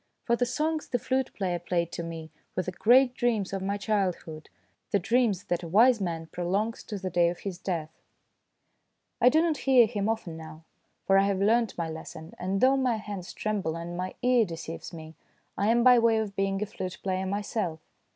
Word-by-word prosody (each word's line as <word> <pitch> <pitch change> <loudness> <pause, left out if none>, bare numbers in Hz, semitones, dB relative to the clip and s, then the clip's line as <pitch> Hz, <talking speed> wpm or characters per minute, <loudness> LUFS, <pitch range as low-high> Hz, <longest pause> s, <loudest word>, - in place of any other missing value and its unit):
For 235 - +2
the 245 +1 0
songs 310 +4 -1
the 245 - +1
flute 260 +2 -1
player 180 -3 -1
played 170 -1 -1
to - - -4
me 165 -2 -7 0.2
were 185 - 0
the 185 - -4
great 245 +7 +4
dreams 225 -6 0
of 195 - -2
my 200 +2 -1
childhood, 190 -7 -2 0.4
the - - +3
dreams 210 0 +1
that 175 -1 -2
a 170 - -6
wise 225 +6 +5
man 165 -3 -3
prolongs 195 +7 -2
to 210 - -5
the 190 -1 -4
day 170 0 +3
of 175 - -6
his 190 -3 -5
death. 165 -4 -3 1.3
I 250 - +7
do 315 +4 +3
not 325 -3 +1
hear 260 -3 +5
him 210 -2 -2
often 220 -7 -3
now, 160 0 -10 0.4
for 195 0 +5
I 195 - +3
have 200 -1 0
learnt 225 +2 +2
my 170 -1 -2
lesson, 160 0 -8
and 190 +2 -1
though 265 +1 +5
my 255 -3 +1
hands 205 -4 -6
tremble 200 -7 -2
and 170 +1 -6
my 185 +1 -4
ear 250 -2 +4
deceives 165 -3 -6
me, 160 -2 -9 0.4
I 200 - 0
am 235 +1 +4
by 250 -1 +7
way 230 -1 +3
of 210 -3 -2
being 195 +1 0
a - - -2
flute 185 -3 -6
player 190 0 -1
myself. 200 -4 -2
195 Hz, 205 wpm, -28 LUFS, 175-230 Hz, 1.3 s, I